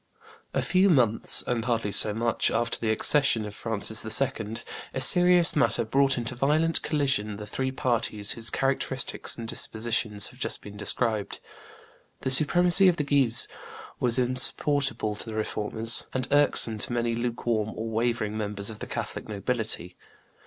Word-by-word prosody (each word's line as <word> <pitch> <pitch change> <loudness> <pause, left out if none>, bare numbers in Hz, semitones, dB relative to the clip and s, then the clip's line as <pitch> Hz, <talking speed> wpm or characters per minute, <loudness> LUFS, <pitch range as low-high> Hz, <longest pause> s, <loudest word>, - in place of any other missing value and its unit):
A - - 0
few 190 +1 +2
months, 120 - +2
and 120 -2 -2
hardly 115 -4 -2
so 105 - +5
much, 115 +2 0
after 120 - -2
the 115 - -3
accession 115 0 +2
of 105 - -8
Francis 110 0 -2
II., 110 -1 0 0.4
a - - -2
serious 180 -1 +6
matter 140 -5 +1
brought 135 +4 +1
into 120 +1 -3
violent 150 +6 +1
collision 135 -9 -1
the 105 +1 -9
three 130 +5 -4
parties 115 -6 -1
whose 115 -1 -1
characteristics 135 -1 -2
and 115 -1 -7
dispositions 110 -2 -2
have - - -18
just - - -1
been 105 0 -11
described. 105 +1 -2 0.8
The 130 - -2
supremacy 175 +7 +5
of 180 - +3
the 150 - -1
Guises 135 -5 +1 0.5
was 120 0 0
insupportable 130 -1 +1
to 115 - -5
the 110 - -7
Reformers, 110 +1 +1
and 130 -1 -2
irksome 140 -6 +2
to 120 - -4
many 120 -1 -1
lukewarm 115 -2 -3
or 110 - -5
wavering 115 -1 -2
members 105 -1 -5
of 110 - -10
the - - -7
Catholic - - -6
nobility. 105 -4 -2
115 Hz, 155 wpm, -25 LUFS, 110-135 Hz, 0.8 s, serious